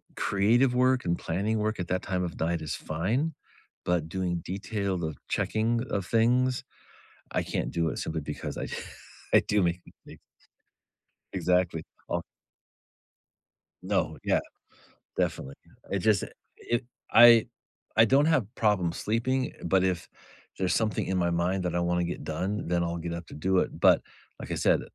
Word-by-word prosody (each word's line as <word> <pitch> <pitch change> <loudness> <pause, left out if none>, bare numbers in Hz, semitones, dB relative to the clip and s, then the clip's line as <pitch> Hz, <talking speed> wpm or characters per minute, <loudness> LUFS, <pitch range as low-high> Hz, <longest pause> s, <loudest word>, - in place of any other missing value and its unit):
creative 120 +6 +3
work 130 0 +3
and 85 0 +1
planning 100 +6 -1
work 110 -1 -1
at 90 - -3
that 90 0 0
time 90 -1 -1
of 85 - -4
night 85 +1 0
is 80 - -3
fine. 110 - -1 0.5
But 85 -3 0
doing 90 -2 -2
detailed 95 -5 -2
checking 115 +2 0
of 100 -2 -1
things, 125 +4 +2 0.7
I - - +1
can't - - -2
do 85 -1 +1
it - - -4
simply 80 0 -3
because 75 +1 -5
I - - -3 0.7
I - - +8
do 105 -2 +1
make 85 0 0
mistakes. - - -16 1.1
Exactly, 90 -3 +1 0.3
o - - 0 1.6
No, - - 0
yeah. - - +3 0.8
Definitely. 70 +1 -1 0.4
It 100 - +1
just, 105 0 +3
it - - -8 0.2
if 120 0 -1 0.3
I 115 -1 +8 0.5
I 110 - +9
don't 135 +6 +4
have 155 -9 +3
problem 100 -6 +2
sleeping, 120 +8 -1
but 95 +2 +3
if 95 -2 -1 0.5
there's 95 -1 +1
something 110 -2 0
in 95 - -1
my 85 -1 +2
mind 90 +2 0
that 90 -1 -1
I 85 - +2
wanna 90 0 +1
get 85 +1 -4
done, 95 +7 -2
then 85 0 +1
I'll 85 0 -2
get 85 0 -4
up 85 0 -6
to - - -11
do 90 +5 +1
it. - - -2
But, - - +6 0.4
like - - -7
I - - 0
said, - - +3
95 Hz, 160 wpm, -28 LUFS, 85-110 Hz, 1.6 s, I